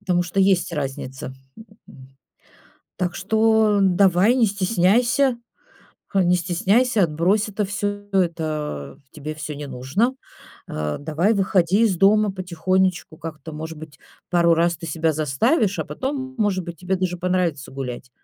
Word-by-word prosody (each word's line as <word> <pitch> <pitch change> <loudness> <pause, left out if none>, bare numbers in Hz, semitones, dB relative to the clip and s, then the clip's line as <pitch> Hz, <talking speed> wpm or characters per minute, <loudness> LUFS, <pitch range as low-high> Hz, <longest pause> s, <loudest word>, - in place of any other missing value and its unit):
потому 180 -3 +1
что 175 +2 -5
есть 190 -3 +2
разница, 135 -3 -5 0.6
м, 130 0 -14 0.9
так 180 -1 -2
что 220 +1 +2
давай, 190 +4 +4
не 240 -4 +3
стесняйся. 230 +7 +2 0.8
А, 190 -2 +4
не 180 +1 +3
стесняйся, 200 +6 +2
отбрось 180 +8 +1
это 205 +1 -1
всё. 205 +1 -4
Это 155 - -2
тебе 155 +1 -6
всё 155 -1 -6
не 145 0 -7
нужно. 140 - -1 0.5
А, 75 -1 -3
давай 160 +9 0
выходи 190 +1 +2
из 200 -6 +2
дома 205 +2 +4
потихонечку, 185 -2 -1
как-то, 160 -1 -8
может 160 +1 -6
быть, 155 -2 -11 0.3
пару 170 -1 +4
раз 170 0 +1
ты 165 +1 -8
себя 160 0 0
заставишь, 155 - +1
а - - -1
потом, 265 -1 -4
может 195 -4 0
быть, 170 -2 -8
тебе 185 +2 -1
даже 180 -1 -2
понравится 180 -6 -1
гулять. 125 -2 -6
180 Hz, 140 wpm, -22 LUFS, 155-205 Hz, 0.9 s, давай